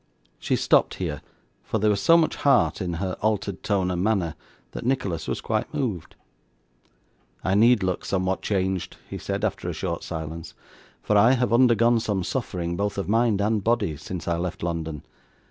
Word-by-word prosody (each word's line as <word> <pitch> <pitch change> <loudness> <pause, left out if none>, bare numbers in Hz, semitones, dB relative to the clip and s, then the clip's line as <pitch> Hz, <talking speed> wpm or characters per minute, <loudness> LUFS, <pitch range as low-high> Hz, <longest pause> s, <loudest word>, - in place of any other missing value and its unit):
She - - 0
stopped - - +3
here; 75 -5 -4 0.4
for - - -2
there 105 0 +3
was 100 -1 0
so 165 +10 +6
much 165 -2 +1
heart 135 -6 +3
in 90 -2 -2
her 90 +2 -3
altered 105 -3 -1
tone 95 -3 0
and 90 0 -1
manner, 95 -7 +1 0.4
that - - -6
Nicholas 100 -10 -1
was - - -2
quite - - -2
moved. 105 - -3 1.3
'I 95 - +1
need 110 +1 +5
look 95 -1 -1
somewhat 95 -1 -1
changed,' 95 -3 -1
he - - -6
said, - - -2
after - - -3
a - - -3
short - - -3
silence; 80 +1 -6 0.5
'for 105 - +1
I 115 +5 +6
have 125 -2 +1
undergone 120 -1 +4
some 105 -4 -1
suffering, 90 -8 -3
both 100 +2 -2
of 100 - -2
mind 110 -1 +2
and 105 0 +1
body, 115 -8 +1
since 85 +4 -7
I 85 0 +1
left 85 0 -4
London. 80 -3 -3
100 Hz, 180 wpm, -25 LUFS, 90-115 Hz, 1.3 s, so